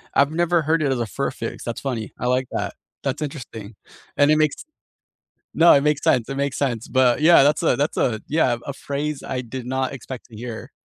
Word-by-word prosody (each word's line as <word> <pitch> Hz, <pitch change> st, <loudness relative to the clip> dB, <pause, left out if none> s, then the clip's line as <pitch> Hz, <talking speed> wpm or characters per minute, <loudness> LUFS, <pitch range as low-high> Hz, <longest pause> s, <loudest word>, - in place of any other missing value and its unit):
I've 140 Hz, +2 st, +4 dB
never 175 Hz, +1 st, +2 dB
heard 160 Hz, +1 st, +1 dB
it 140 Hz, -, +1 dB
as 130 Hz, -, 0 dB
a 120 Hz, -, 0 dB
fur 105 Hz, -, -3 dB
fix, -, -, -6 dB
that's 120 Hz, -, -5 dB
funny, 120 Hz, -6 st, -4 dB
I 125 Hz, -, -2 dB
like 130 Hz, +1 st, +1 dB
that, -, -, -3 dB, 0.3 s
that's -, -, -2 dB
interesting. 115 Hz, -8 st, -7 dB, 0.4 s
And 145 Hz, +1 st, +5 dB
it 155 Hz, -, +4 dB
makes 155 Hz, -2 st, +2 dB, 1.0 s
No 170 Hz, +1 st, +7 dB
it 140 Hz, -, +4 dB
makes 150 Hz, -1 st, +1 dB
sense, 120 Hz, -1 st, +2 dB
it 135 Hz, -, -4 dB
makes 140 Hz, -1 st, -1 dB
sense, 120 Hz, -6 st, -2 dB
but, 130 Hz, 0 st, +3 dB
yeah, 165 Hz, -3 st, +7 dB
that's 145 Hz, +1 st, +3 dB
a -, -, +3 dB
that's 145 Hz, +2 st, -1 dB
a 110 Hz, -4 st, 0 dB
Yeah, 135 Hz, -6 st, +2 dB
a 140 Hz, -, -3 dB
phrase 145 Hz, +1 st, -4 dB
I 125 Hz, -, -2 dB
did 125 Hz, +1 st, -7 dB
not 130 Hz, +1 st, -1 dB
expect 130 Hz, -1 st, -8 dB
to 115 Hz, -, -14 dB
hear, 115 Hz, 0 st, -7 dB
135 Hz, 220 wpm, -22 LUFS, 125-150 Hz, 1.0 s, No